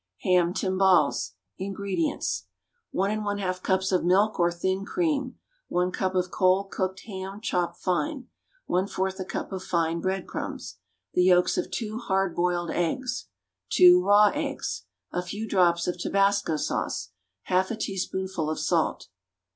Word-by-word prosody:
=Ham 180 Hz, -2 st, +3 dB
Timbales.= 185 Hz, -, +2 dB, 0.3 s
INGREDIENTS. 185 Hz, -, -2 dB, 0.4 s
1 195 Hz, +2 st, 0 dB
1/2 200 Hz, -3 st, -2 dB
cups 190 Hz, +1 st, +1 dB
of 185 Hz, -, +2 dB
milk 195 Hz, +5 st, +3 dB
or 175 Hz, 0 st, +3 dB
thin 190 Hz, +3 st, -1 dB
cream. 285 Hz, -, -1 dB, 0.3 s
1 180 Hz, +1 st, 0 dB
cup 185 Hz, 0 st, -1 dB
of 180 Hz, 0 st, 0 dB
cold, 190 Hz, +1 st, +2 dB
cooked 190 Hz, 0 st, -2 dB
ham, 195 Hz, -1 st, -7 dB
chopped 175 Hz, -5 st, -1 dB
fine. 180 Hz, -, -1 dB, 0.4 s
1/4 190 Hz, +1 st, -1 dB
a -, -, -1 dB
cup -, -, -5 dB
of 190 Hz, -1 st, -4 dB
fine 165 Hz, -1 st, 0 dB
bread 190 Hz, +1 st, -1 dB
crumbs. -, -, -6 dB, 0.3 s
The 180 Hz, -, +3 dB
yolks 180 Hz, -1 st, +4 dB
of -, -, -1 dB
2 215 Hz, 0 st, -4 dB
"hard 195 Hz, -6 st, 0 dB
boiled" 175 Hz, -1 st, 0 dB
eggs. 250 Hz, +9 st, -2 dB, 0.4 s
Two 360 Hz, 0 st, +7 dB
raw 205 Hz, 0 st, +6 dB
eggs. -, -, -3 dB, 0.3 s
A 180 Hz, -, -1 dB
few 205 Hz, +5 st, -5 dB
drops 175 Hz, -4 st, +3 dB
of 180 Hz, 0 st, -2 dB
tabasco 195 Hz, -3 st, +2 dB
sauce. 95 Hz, -9 st, -2 dB, 0.4 s
1/2 185 Hz, +1 st, +2 dB
a 230 Hz, -, -2 dB
teaspoonful 190 Hz, -5 st, -3 dB
of 155 Hz, -, -2 dB
salt. -, -, 0 dB
190 Hz, 145 wpm, -26 LUFS, 175-200 Hz, 0.4 s, Two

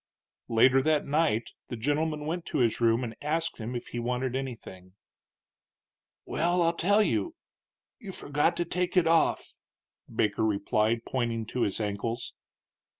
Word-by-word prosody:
Later 130 Hz, +4 st, +5 dB
that 155 Hz, +1 st, +2 dB
night 145 Hz, -6 st, +1 dB, 0.2 s
the -, -, -5 dB
gentleman 150 Hz, +4 st, -1 dB
went 170 Hz, +2 st, -2 dB
to 155 Hz, -, -2 dB
his 120 Hz, -3 st, +1 dB
room 115 Hz, +1 st, +3 dB
and 115 Hz, -2 st, -5 dB
asked 160 Hz, +1 st, -1 dB
him 115 Hz, +3 st, -5 dB
if 120 Hz, -, -5 dB
he 120 Hz, -, -4 dB
wanted 125 Hz, +1 st, -2 dB
anything. 110 Hz, -8 st, -7 dB, 1.3 s
"Well, 175 Hz, +2 st, +1 dB
I'll 165 Hz, 0 st, +2 dB
tell 200 Hz, +5 st, +3 dB
you. 335 Hz, +10 st, -1 dB, 0.6 s
You 205 Hz, -6 st, -8 dB
forgot 150 Hz, 0 st, 0 dB
to 175 Hz, -, 0 dB
take 180 Hz, +2 st, -1 dB
it 180 Hz, -, +5 dB
off," 165 Hz, 0 st, +2 dB, 0.5 s
Baker 105 Hz, 0 st, 0 dB
replied, 110 Hz, +2 st, +1 dB
pointing 120 Hz, -3 st, -2 dB
to 125 Hz, +3 st, -4 dB
his 100 Hz, -1 st, 0 dB
ankles. 115 Hz, +3 st, -3 dB
130 Hz, 150 wpm, -28 LUFS, 115-165 Hz, 1.3 s, Later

